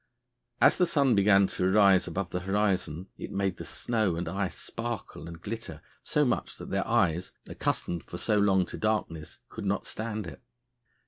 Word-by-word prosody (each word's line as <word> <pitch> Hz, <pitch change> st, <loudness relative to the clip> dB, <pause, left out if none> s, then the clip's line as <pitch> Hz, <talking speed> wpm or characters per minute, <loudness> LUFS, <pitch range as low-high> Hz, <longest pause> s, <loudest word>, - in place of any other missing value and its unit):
As -, -, +5 dB
the 180 Hz, -, +4 dB
sun 140 Hz, -6 st, +3 dB
began 100 Hz, 0 st, +5 dB
to 90 Hz, -1 st, 0 dB
rise 100 Hz, -2 st, +5 dB
above 90 Hz, +1 st, -3 dB
the 90 Hz, -, -1 dB
horizon 95 Hz, -3 st, -1 dB
it -, -, -6 dB
made 95 Hz, -2 st, -1 dB
the -, -, -7 dB
snow 110 Hz, -7 st, -1 dB
and 85 Hz, +1 st, -3 dB
ice 95 Hz, +2 st, -2 dB
sparkle 115 Hz, -5 st, -5 dB
and 85 Hz, 0 st, -9 dB
glitter 100 Hz, -5 st, -6 dB, 0.2 s
so 150 Hz, -, +1 dB
much 125 Hz, -, -1 dB
that -, -, -9 dB
their -, -, 0 dB
eyes, 85 Hz, +3 st, +1 dB
accustomed 85 Hz, -1 st, -2 dB
for 85 Hz, -, -7 dB
so 105 Hz, +2 st, +1 dB
long 95 Hz, -2 st, +3 dB
to -, -, -8 dB
darkness, 105 Hz, -8 st, -2 dB
could -, -, -7 dB
not -, -, 0 dB
stand 110 Hz, -2 st, -4 dB
it. 85 Hz, -, -9 dB
100 Hz, 180 wpm, -29 LUFS, 90-110 Hz, 0.2 s, As